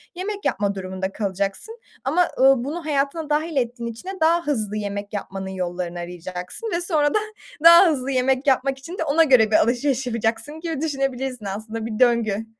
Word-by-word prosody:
yemek 400 +3 -5
yapma 200 0 0
durumunda 190 0 -4
kalacaksın. 200 - -3 0.2
Ama, 330 +7 +2
ııı, 265 -1 +5
bunu 310 +5 -5
hayatına 295 +1 -1
dâhil 310 +2 0
ettiğin 240 -2 -2
için 235 +12 -9
de - - -4
daha 335 0 +3
hızlı 215 -7 -1
yemek 205 0 -5
yapmanın 195 -1 -5
yollarını 180 -2 -4
arayacaksın 180 - -6
ve - - -3
sonra 305 -5 +1
da - - +3 0.4
daha 340 +3 +9
hızlı 275 -4 -1
yemek 260 +2 +1
yapmak 270 0 +2
için 335 +7 -9
de - - -1
ona 315 +2 +4
göre 250 -8 +4
bir - - +4
alışveriş 255 +2 +1
yapacaksın 230 +6 -2
gibi 325 -4 -4
düşünebilirsin 270 -5 -2
aslında 220 +3 -5
bir 220 -2 -5
döngü. 230 -4 +2
255 Hz, 175 wpm, -22 LUFS, 205-305 Hz, 0.4 s, daha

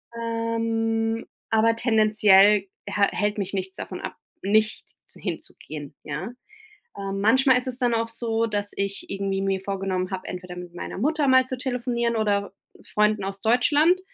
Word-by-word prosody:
Ähm, 230 -1 -1 0.2
aber 225 +1 +3
tendenziell 210 -3 +5 0.2
hä 205 - -2
hält 205 0 -1
mich 200 -2 -3
nichts 190 -1 -3
davon 185 - -6
ab, - - -6 0.3
nicht 215 +2 +2 0.3
hinzugehen, 145 -2 -7
ja? 205 +6 -5 0.7
Ähm, 195 0 -4
manchmal 260 +4 +5
ist 250 - -5
es 250 -1 -2
dann 245 -2 +2
auch 230 0 0
so, 230 0 -1
dass 205 -2 -2
ich 200 0 -1
irgendwie 195 0 -2
mir 195 -1 0
vorgenommen 190 -1 -2
habe, 190 -1 -5
entweder 180 0 -7
mit 175 -1 -9
meiner - - -6
Mutter 295 - +1
mal 260 0 +6
zu 255 - -4
telefonieren 240 -2 -1
oder 205 -2 0 0.3
Freunden 210 -1 +1
aus 195 0 -5
Deutschland, 295 - +4
215 Hz, 155 wpm, -25 LUFS, 195-230 Hz, 0.7 s, mal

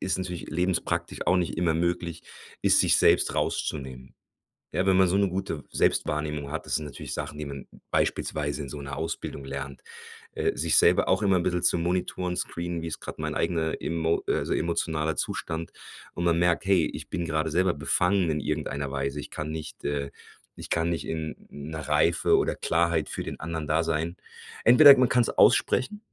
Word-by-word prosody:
ist 95 -1 -1
natürlich 90 -2 -5
lebenspraktisch 90 +2 -1
auch 95 - +4
nicht 90 -2 -1
immer 85 -1 +1
möglich 85 0 -2 0.4
ist, - - +5
sich - - +4
selbst - - +4
rauszunehmen. 65 -3 -3 0.6
Ja, 95 - 0
wenn 95 -1 +4
man 95 -1 +5
so 90 - +1
'ne 100 0 +3
gute 90 -5 -4
Selbstwahrnehmung 75 -1 0
hat 80 - -5
das - - -2
sind 80 - -3
natürlich 70 - -7
Sachen, 75 - -5
die 75 - -4
man 70 -2 -7 0.2
beispielsweise 75 -1 -1
in 70 - -7
so 75 - -7
'ner 70 0 -6
Ausbildung 80 -3 -4
lernt. 70 0 -6 0.5
Äh, - - -1
sich - - +2
selber 90 +1 +5
auch 95 - +3
immer 100 -2 +3
'n 85 - 0
bissel 90 -1 0
zu - - +3
monitoren 90 +1 -1
screenen, 85 0 -3
wie's 80 0 -5
grad - - -8
mein - - -3
eigener 80 -2 -1
emo 80 0 0
also - - 0
emotionaler 80 -2 -1
Zustand 80 0 -3 0.4
und 85 - -3
man 85 -1 +3
merkt: 85 -1 +2
„Hey, 95 -4 +4
ich - - -8
bin 85 - -2
gerade 80 0 -1
selber 90 +2 +2
befangen 90 +5 +1
in 75 - -1
irgendeiner 70 0 -3
Weise. 70 +1 -2
Ich - - -8
kann 75 0 -4
nicht, 80 -1 -7
äh 70 -1 -2 0.4
ich - - -9
kann 85 0 +1
nicht 80 -5 -3
in 80 -1 -4
'ner 80 +2 -7
Reife 80 +3 +3
oder - - 0
Klarheit 80 -2 +1
für - - -4
den - - -6
anderen 80 -1 -4
da 80 +2 +2
sein. 80 +1 -1 0.5
Entweder 140 +4 +9
man 125 -1 +3
kann's 120 -2 +3
aussprechen, 205 +11 +3
80 Hz, 190 wpm, -27 LUFS, 75-90 Hz, 0.6 s, Entweder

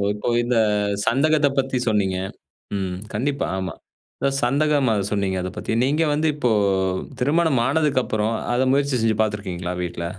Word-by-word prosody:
ஓ - - 0
இப்போ 105 - -4
இந்த 120 0 0 0.5
சந்தகத்தை 145 +3 +3
பத்தி 130 -1 0
சொன்னீங்க. 100 -4 +1 0.6
ம். 95 -2 -3 0.2
கண்டிப்பா. 140 +2 -1
ஆமா. 95 -2 -3 0.7
சந்தகமா 140 -2 +2 0.2
சொன்னீங்க 100 -2 0
அத 90 - -3
பத்தி. - - -4
நீங்க 150 +5 +2
வந்து 155 +2 +1
இப்போ 125 -6 +1 0.7
திருமணம் 145 -1 +2
ஆனதுக்கப்புறம், 130 -8 +1 0.2
அத 125 - +1
முயற்சி 140 -1 +1
செஞ்சி 110 -2 +1
பார்த்து 105 -1 0
இருக்கீங்களா 90 -2 -4
வீட்ல? 85 -1 -4
125 Hz, 140 wpm, -22 LUFS, 100-145 Hz, 0.7 s, சந்தகத்தை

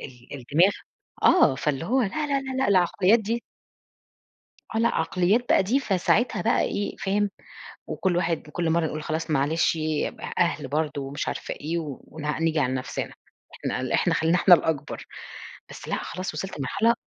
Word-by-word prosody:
ال - - -8
ال 125 -2 -12
الدماغ 155 +10 +3 0.5
آه 335 - +6
فاللي 150 +2 -2
هو 255 +7 +2
لا، 210 - 0
لا، 300 +8 -2
لا، 280 -1 0
لا، 260 - -4
لأ 265 - +2
العقليات 190 +3 +4
دي 225 +3 -2 1.3
آه، 220 - +1
لأ 230 - +3
عقليات 185 +6 +2
بقى - - +5
دي، 245 +9 +1
فساعتها 220 +1 +1
بقى 230 - +2
إيه 205 - -2
فاهم؟ 200 +1 0 0.6
وكل 180 -2 0
واحد 165 -3 -1
كل 170 0 -1
مرّة 165 0 +2
نقول 155 -1 -4
خلاص 160 +2 -3
معلش 155 +4 +2
أ 155 -1 -1 0.3
أهل 170 -5 +1
برضو 145 -1 -2
ومش 140 +2 -4
عارفة - - -3
إيه 160 +4 -4
ون 150 0 -8 0.2
نيجي 165 -1 +2
على 130 -2 +1
نفسنا. 130 -1 -4 0.4
إحنا - - -3
ل - - -3
إحنا - - +2
خلّينا 165 +3 +2
إحنا 180 - +7
الأكبر، 160 -3 -3 0.6
بس - - -10
لأ - - -1
خلاص 185 -1 -5
وصلت 185 +1 -5
لمرحلة 225 - +2
170 Hz, 175 wpm, -25 LUFS, 150-205 Hz, 1.3 s, إحنا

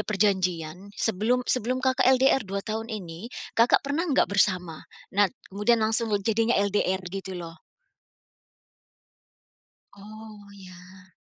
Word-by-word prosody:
perjanjian 185 -4 0
sebelum 225 +4 0
sebelum 250 +1 0
Kakak 260 -1 +3
LDR 265 +1 +4
2 195 -2 -5
tahun 220 +1 -4
ini, 195 -1 -7 0.2
Kakak 230 +4 +3
pernah 305 +5 -1
nggak 270 -7 +2
bersama? 180 -5 +1 0.3
Nah 200 0 +4 0.2
kemudian 210 +4 +2
langsung 225 +1 0
le 205 -2 0
jadinya 225 +2 +2
LDR 190 -1 0
gitu 190 0 -6
loh. 170 -1 -8 2.3
Oh, 210 +1 -12
ya. 185 -1 -15
205 Hz, 115 wpm, -26 LUFS, 185-230 Hz, 2.3 s, LDR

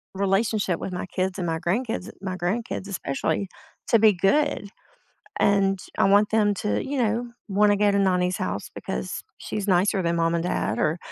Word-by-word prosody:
relationship 195 -1 +1
with - - -5
my 180 - -4
kids 185 +1 -2
and 175 - -2
my 165 -1 0
grandkids 195 +4 -2
my 190 -2 -3
grandkids 195 +2 -2
especially, 160 0 -2 0.4
to 230 - +5
be 215 -1 +6
good, 205 - +1 0.7
and, 195 -1 +3 0.2
I - - +4
want 205 +2 +4
them 215 -2 +3
to, 210 - -1
you 275 0 -3
know, 235 +2 -1 0.2
wanna 205 +1 +3
go 205 0 +3
to 200 - +2
Nonnie's 180 -1 +2
house 100 - -3
because 60 0 -4 0.2
she's 205 -1 -4
nicer 190 +2 +3
than 170 0 0
mom 165 0 +1
and 170 - 0
dad, 180 - -1
or, 155 +3 +1
195 Hz, 180 wpm, -25 LUFS, 180-210 Hz, 0.7 s, be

